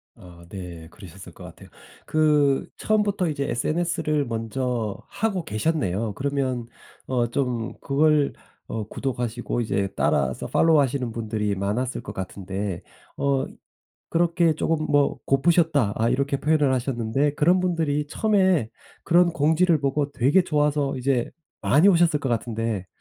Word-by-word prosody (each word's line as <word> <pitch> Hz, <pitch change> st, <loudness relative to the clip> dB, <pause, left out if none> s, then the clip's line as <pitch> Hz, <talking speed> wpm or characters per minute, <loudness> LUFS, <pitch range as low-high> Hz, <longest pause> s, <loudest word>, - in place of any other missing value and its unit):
아 90 Hz, -5 st, -15 dB
네 85 Hz, -4 st, -8 dB
그러셨을 95 Hz, 0 st, -12 dB
것 -, -, -13 dB
같아요. -, -, -12 dB, 0.4 s
그 150 Hz, -3 st, +2 dB
처음부터 205 Hz, -3 st, +1 dB
이제 140 Hz, -2 st, -2 dB
SNS를 155 Hz, +2 st, 0 dB
먼저 115 Hz, -1 st, -3 dB
하고 200 Hz, -4 st, -1 dB
계셨네요. 110 Hz, -, -1 dB
그러면 130 Hz, -1 st, -2 dB, 0.4 s
어 125 Hz, -2 st, +1 dB
좀 120 Hz, -2 st, -2 dB
그걸 150 Hz, +1 st, +2 dB, 0.3 s
어 110 Hz, -2 st, -4 dB
구독하시고 120 Hz, -2 st, -3 dB
이제 100 Hz, -3 st, -1 dB
따라서 65 Hz, -2 st, 0 dB
팔로우 160 Hz, -2 st, +4 dB
하시는 130 Hz, -3 st, 0 dB
분들이 105 Hz, -3 st, -2 dB
많았을 105 Hz, +7 st, -2 dB
것 -, -, -8 dB
같은데 95 Hz, 0 st, -5 dB, 0.4 s
어 140 Hz, -1 st, +1 dB, 0.7 s
그렇게 170 Hz, -1 st, +2 dB
쪼금 155 Hz, 0 st, -1 dB
뭐 145 Hz, -1 st, +2 dB
"고프셨다." 145 Hz, -, +2 dB
아 115 Hz, +1 st, +1 dB
이렇게 140 Hz, +3 st, 0 dB
표현을 150 Hz, -2 st, +2 dB
하셨는데 130 Hz, +3 st, -1 dB
그런 175 Hz, +5 st, +3 dB
분들이 160 Hz, -5 st, 0 dB
처음에 190 Hz, -, +2 dB, 0.3 s
그런 175 Hz, 0 st, +4 dB
공지를 160 Hz, +1 st, +2 dB
보고 140 Hz, +1 st, 0 dB
되게 140 Hz, +9 st, +3 dB
좋아서 150 Hz, -3 st, 0 dB
이제 130 Hz, -1 st, 0 dB, 0.3 s
많이 155 Hz, +9 st, +4 dB
오셨을 170 Hz, -5 st, +4 dB
것 135 Hz, -, -2 dB
같은데 115 Hz, -4 st, -2 dB
140 Hz, 300 characters per minute, -24 LUFS, 115-155 Hz, 0.7 s, 팔로우